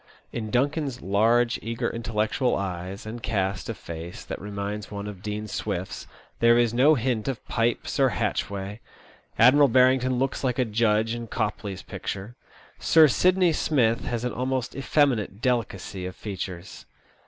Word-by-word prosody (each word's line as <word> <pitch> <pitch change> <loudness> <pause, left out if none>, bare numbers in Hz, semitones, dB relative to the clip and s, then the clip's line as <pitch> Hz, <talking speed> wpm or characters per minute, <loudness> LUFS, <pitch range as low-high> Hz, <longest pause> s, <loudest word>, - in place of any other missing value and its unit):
In 110 -2 -4
Duncan's 135 +2 0
large, 115 +5 +3
eager, 115 +1 -2
intellectual 115 +2 0
eyes 95 +1 -4
and 115 +2 -6
cast 95 -2 -1
of 115 - -4
face, 85 +1 -8
that - - -6
reminds 100 +1 -5
one 100 -1 -5
of 100 -3 -7
Dean 105 +1 -4
Swift's, - - -4 0.3
there 115 0 +5
is 120 -2 +2
no 140 +6 +5
hint 120 -3 -1
of 135 -3 -3
Pipes 115 0 -1
or - - +5
Hatchway. 100 +1 -2 0.6
Admiral 140 +5 +7
Barrington 130 0 +4
looks 135 +2 -1
like 125 -2 0
a 130 - +2
judge 110 0 +1
in 120 -1 -5
Copley's 105 -3 -3
picture. 105 +6 -6 0.4
Sir 160 -1 +6
Sidney 180 - +3
Smith 120 -7 +1
has 120 -1 -2
an 125 - -2
almost 130 0 -2
effeminate 135 -8 +1
delicacy 105 -6 -2
of 90 - -8
features. 95 -3 -7
115 Hz, 150 wpm, -26 LUFS, 100-125 Hz, 0.6 s, Admiral